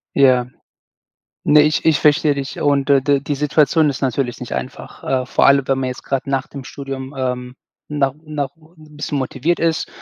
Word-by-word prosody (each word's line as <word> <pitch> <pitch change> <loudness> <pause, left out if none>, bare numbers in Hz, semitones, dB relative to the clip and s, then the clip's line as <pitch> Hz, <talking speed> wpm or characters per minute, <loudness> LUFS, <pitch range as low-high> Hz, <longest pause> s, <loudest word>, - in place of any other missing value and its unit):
Ja. 130 -3 +4 1.0
Ne, 150 0 +6
ich 155 0 +1
ich 160 -2 +3
verstehe 150 -1 +3
dich 140 -1 -5
und, 140 -1 +1
äh, 135 -1 +6
d 140 0 +2
die 145 +1 -3
Situation 150 +1 +3
ist 135 - -3
natürlich 130 -1 -1
nicht - - -7
einfach, - - -6
äh, 130 -1 0
vor - - +3
allem 140 -1 +4
wenn 135 0 +2
man 130 -1 -1
jetzt 125 - -6
grad 135 0 -2
nach 135 +1 -1
dem 140 -2 -9
Studium, 135 0 -7
ähm, 125 -1 -3 0.3
no 140 -3 0
noch 145 -3 -3
'n 155 -2 -19
bisschen 150 -1 -3
motiviert 135 +6 -1
ist, 165 -1 0
140 Hz, 190 wpm, -19 LUFS, 130-150 Hz, 1.0 s, Ne